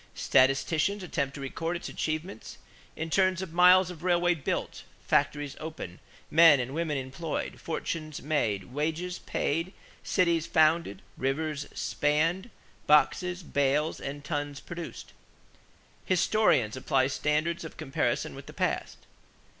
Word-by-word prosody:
Statisticians 155 Hz, +9 st, +2 dB
attempt 140 Hz, -5 st, -2 dB
to 140 Hz, -, -7 dB
record 165 Hz, +5 st, -3 dB
its 170 Hz, -, -5 dB
achievements 155 Hz, -, -4 dB, 0.4 s
in 160 Hz, 0 st, -5 dB
terms 185 Hz, 0 st, +3 dB
of 175 Hz, -4 st, -8 dB
miles 180 Hz, +1 st, +6 dB
of 170 Hz, -3 st, -11 dB
railways 175 Hz, -1 st, +2 dB
built, -, -, -2 dB, 0.2 s
factories 145 Hz, -2 st, +1 dB
opened, 155 Hz, -, -7 dB, 0.3 s
men 160 Hz, -3 st, +7 dB
and 125 Hz, +2 st, -3 dB
women 160 Hz, -2 st, -1 dB
employed, 140 Hz, +5 st, -4 dB
fortunes 155 Hz, -2 st, -4 dB
made, 115 Hz, -10 st, 0 dB
wages 160 Hz, +5 st, -2 dB
paid, 165 Hz, +6 st, -2 dB, 0.3 s
cities 170 Hz, -4 st, +1 dB
founded, 155 Hz, -, +2 dB
rivers 140 Hz, +2 st, -2 dB
spanned, 165 Hz, +8 st, 0 dB, 0.4 s
boxes, 180 Hz, +4 st, +3 dB
bales, 145 Hz, +1 st, 0 dB
and 145 Hz, +1 st, -6 dB
tons 145 Hz, -2 st, -3 dB
produced. 170 Hz, -1 st, -8 dB, 0.9 s
Historians 180 Hz, -, +2 dB
apply 130 Hz, 0 st, +1 dB
standards 150 Hz, +5 st, 0 dB
of 160 Hz, -, -9 dB
comparison 135 Hz, -, -1 dB
with -, -, -11 dB
the -, -, -10 dB
past. -, -, -2 dB
155 Hz, 120 wpm, -28 LUFS, 140-170 Hz, 0.9 s, men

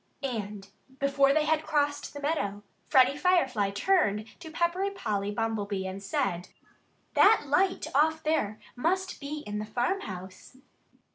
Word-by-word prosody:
And 210 Hz, -6 st, -4 dB, 0.3 s
before 275 Hz, 0 st, +3 dB
they 305 Hz, +1 st, +2 dB
had 310 Hz, 0 st, +2 dB
crossed 290 Hz, -2 st, -1 dB
the -, -, -5 dB
meadow 205 Hz, -10 st, -2 dB, 0.3 s
Freddie 265 Hz, +1 st, +5 dB
Firefly 265 Hz, -, +2 dB
turned 210 Hz, -, +1 dB
to 335 Hz, -2 st, -9 dB
Peppery 345 Hz, +4 st, 0 dB
Polly 205 Hz, -, -2 dB
Bumblebee 205 Hz, -3 st, -2 dB
and 190 Hz, +1 st, -5 dB
said: 185 Hz, -2 st, -2 dB, 0.6 s
"That 430 Hz, -2 st, +6 dB
light 370 Hz, +7 st, +1 dB
off 315 Hz, +3 st, +2 dB
there 220 Hz, -9 st, 0 dB, 0.2 s
must 370 Hz, +8 st, -1 dB
be 295 Hz, +1 st, -5 dB
in 210 Hz, 0 st, -4 dB
the 210 Hz, -, -4 dB
farmhouse." 215 Hz, -, -4 dB
275 Hz, 135 wpm, -28 LUFS, 205-315 Hz, 0.6 s, That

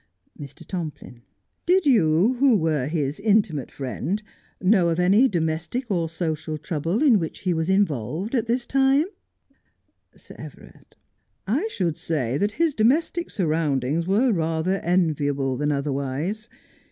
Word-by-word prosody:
Mr. 140 Hz, -3 st, -11 dB
Tomplin: 155 Hz, -9 st, -7 dB, 0.5 s
Did 365 Hz, 0 st, +3 dB
you, 195 Hz, -, +3 dB
who 265 Hz, -5 st, +5 dB
were 155 Hz, -6 st, 0 dB
his 150 Hz, -1 st, -2 dB
intimate 200 Hz, -, +1 dB
friend, 165 Hz, +9 st, -4 dB, 0.4 s
know 185 Hz, -2 st, +3 dB
of 165 Hz, +1 st, -1 dB
any 200 Hz, +9 st, +5 dB
domestic 175 Hz, +7 st, -2 dB
or 170 Hz, -4 st, 0 dB
social 160 Hz, -2 st, -3 dB
trouble 165 Hz, -, -2 dB
in 245 Hz, -9 st, +5 dB
which 165 Hz, -2 st, -5 dB
he 180 Hz, -2 st, 0 dB
was 160 Hz, +1 st, -2 dB
involved 190 Hz, -, 0 dB
at 240 Hz, -3 st, 0 dB
this 240 Hz, +1 st, 0 dB
time 270 Hz, +2 st, +3 dB, 1.1 s
1 -, -, -27 dB
Sir -, -, -14 dB
Everard: -, -, -13 dB, 0.5 s
I 270 Hz, -, 0 dB
should 175 Hz, -, -2 dB
say 130 Hz, -7 st, -2 dB
that 205 Hz, +3 st, 0 dB
his 325 Hz, +2 st, +1 dB
domestic 310 Hz, +9 st, +1 dB
surroundings 155 Hz, -, 0 dB
were 225 Hz, +7 st, +3 dB
rather 165 Hz, +2 st, -1 dB
enviable 145 Hz, -6 st, 0 dB
than 145 Hz, +3 st, -1 dB
otherwise. 140 Hz, -, -3 dB
170 Hz, 140 wpm, -24 LUFS, 155-215 Hz, 1.1 s, who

